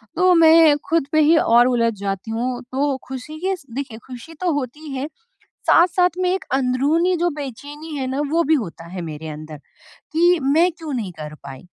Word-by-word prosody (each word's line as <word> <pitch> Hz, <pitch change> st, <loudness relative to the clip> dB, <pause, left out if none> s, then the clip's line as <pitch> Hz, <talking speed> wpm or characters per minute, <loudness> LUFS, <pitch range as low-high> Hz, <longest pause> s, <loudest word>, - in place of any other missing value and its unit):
तो 365 Hz, +1 st, +4 dB
मैं 325 Hz, -2 st, +7 dB
ख़ुद 325 Hz, -4 st, +1 dB
पे 310 Hz, -, +3 dB
ही 315 Hz, +2 st, +5 dB
और 240 Hz, -3 st, +5 dB
उलझ 230 Hz, -2 st, +1 dB
जाती 200 Hz, +2 st, -4 dB
हूँ, 245 Hz, +2 st, -2 dB
तो 275 Hz, +1 st, 0 dB
ख़ुशी 265 Hz, +4 st, -7 dB
के 375 Hz, +3 st, -1 dB
इस 360 Hz, -6 st, -9 dB
देखिए 265 Hz, -5 st, -5 dB
ख़ुशी 260 Hz, +5 st, -10 dB
तो 360 Hz, -2 st, +1 dB
होती 290 Hz, +4 st, -8 dB
है। 270 Hz, +3 st, -3 dB, 0.6 s
साथ-साथ 360 Hz, +1 st, +4 dB
में 365 Hz, -1 st, +1 dB
एक 380 Hz, -, -2 dB
अंदरूनी 280 Hz, +8 st, +1 dB
जो 350 Hz, +1 st, +1 dB
बेचैनी 290 Hz, +3 st, -7 dB
है 265 Hz, -2 st, -2 dB
ना 265 Hz, +2 st, -2 dB
वो 335 Hz, +2 st, +2 dB
भी 320 Hz, -, +5 dB
होता 185 Hz, -, -4 dB
है 185 Hz, 0 st, -6 dB
मेरे 160 Hz, -1 st, -7 dB
अंदर 155 Hz, 0 st, -8 dB, 0.6 s
कि 345 Hz, +2 st, +3 dB
मैं 315 Hz, +7 st, +3 dB
क्यों 320 Hz, -3 st, -7 dB
नहीं 220 Hz, -7 st, -3 dB
कर 150 Hz, 0 st, -7 dB
पाई? 135 Hz, -1 st, -9 dB
280 Hz, 195 wpm, -21 LUFS, 235-325 Hz, 0.6 s, मैं